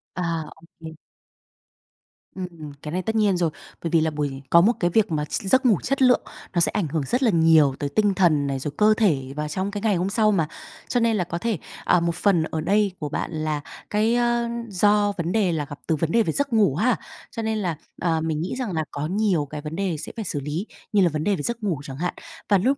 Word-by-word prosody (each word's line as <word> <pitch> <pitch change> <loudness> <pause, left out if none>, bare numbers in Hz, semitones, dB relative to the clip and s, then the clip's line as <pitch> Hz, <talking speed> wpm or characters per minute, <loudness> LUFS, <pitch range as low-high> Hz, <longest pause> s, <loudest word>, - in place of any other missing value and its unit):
À, 180 - -2 0.4
ô - - -16
kê. 160 -1 -9 1.4
Ừm, 170 -5 -7
cái 150 - -6
này 185 +2 -1
tất 220 +3 -3
nhiên 205 -4 +3
rồi, 170 -2 +1 0.3
bởi 165 - -1
vì 165 -1 +3
là 160 - +2
buổi 145 -3 -3
có 170 - +7
một 225 +6 +4
cái 175 - +2
việc 215 0 +2
mà 150 -1 0
gi 195 - -3
giấc 260 +4 +3
ngủ 215 -8 +5
chất 275 0 -1
lượng, 250 -1 +5 0.3
nó 170 - +2
sẽ 160 - +4
ảnh 195 -7 -1
hưởng 150 -1 -1
rất 255 +2 0
là 225 - +4
nhiều 160 -4 +5
tới 145 - -2
tinh 205 +5 +2
thần 155 -6 +3
này, 135 -1 -2
rồi 145 +2 -3
cơ 215 +1 +5
thể 140 -11 +1
và 150 0 -2
trong 190 +6 -2
cái 205 -1 -4
ngày 215 -4 +2
hôm 180 +3 0
sau 215 0 +3
mà, 165 -6 +1 0.4
cho 245 - +1
nên 230 -1 +2
là 180 - +1
có 170 0 -4
thể 220 0 -1 0.3
à, 180 - +4
một 170 -1 -1
phần 175 -4 +2
ở 160 0 -3
đây 200 +3 +2
của 150 -2 -3
bạn - - -3
là, 155 -2 -2 0.3
cái, 220 +3 +2
a 240 -1 +1 0.2
do 205 +1 +3
vấn 170 +1 -2
đề 205 -5 +2
là 150 -3 -1
gặp 145 0 -9
từ 160 - +2
vấn 165 +2 -1
đề 230 -1 +4
về 160 - -1
giấc 280 -3 -1
ngủ 205 -11 +4
ha, 235 +7 +2 0.4
cho 225 - -4
nên 220 0 -1
là, 180 -6 -1 0.3
à, 165 -2 +1
mình 160 -1 -1
nghĩ 185 - -3
rằng 250 -6 -3
là 160 -1 0
có 145 +2 -3
nhiều 190 -5 +1
cái 150 +1 -7
vấn 155 +2 -6
đề 190 -5 -1
sẽ - - -7
phải 220 -3 -4
xử 145 - -2
lý, 150 +9 -4 0.2
như 205 -2 +4
là 175 - +5
vấn 155 0 -3
đề 205 -1 +2
về 145 - -4
giấc 235 +5 -3
ngủ 165 -8 -1
chẳng 135 -1 -8
hạn. 175 +2 -2 0.4
Và 200 - +5
lúc 260 +9 +2
180 Hz, 260 wpm, -24 LUFS, 155-215 Hz, 1.4 s, có